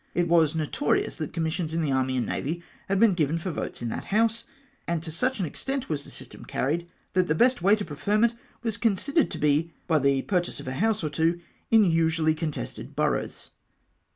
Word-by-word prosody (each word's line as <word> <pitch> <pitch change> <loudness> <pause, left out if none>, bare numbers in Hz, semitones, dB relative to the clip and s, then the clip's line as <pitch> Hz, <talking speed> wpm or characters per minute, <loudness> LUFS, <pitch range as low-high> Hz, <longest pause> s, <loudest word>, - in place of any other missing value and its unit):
It 175 -1 +2
icas 165 -2 +4
notorious 150 -2 0
that 155 -3 -4
commissions 160 0 -2
in 165 - +1
the 145 - 0
Army 130 -1 +1
and 125 - 0
Navy 170 +5 -3 0.3
had 195 0 +2
been 225 -3 +6
given 160 -2 +1
for 175 +2 -3
votes 140 - -5
in 120 - -1
that - - -4
House, 225 +2 +1 0.4
and 170 -2 -1
to 160 - -5
such 255 +9 0
an 185 - +1
extent 270 - -4
w^as 145 -3 -2
the - - -11
system - - -10
carried, 165 +6 -1 0.3
that 185 -1 +2
the 155 - +1
best 250 +4 +3
way 200 +4 +5
to 210 -2 -4
preferment 210 +10 +1 0.3
was 225 -2 -1
considered 255 - +1
to - - -6
be 150 +3 +1
by 160 -2 +3
the 140 -1 +2
pur 180 -3 +2
chase 175 - -6
of - - -9
a 130 - -2
house 215 +6 +1
or 155 - 0
two 165 +3 +1 0.3
in 220 -2 +6
usually 165 -2 +2
contested 155 -1 -5
boroughs. - - -1
165 Hz, 210 wpm, -26 LUFS, 155-205 Hz, 0.4 s, been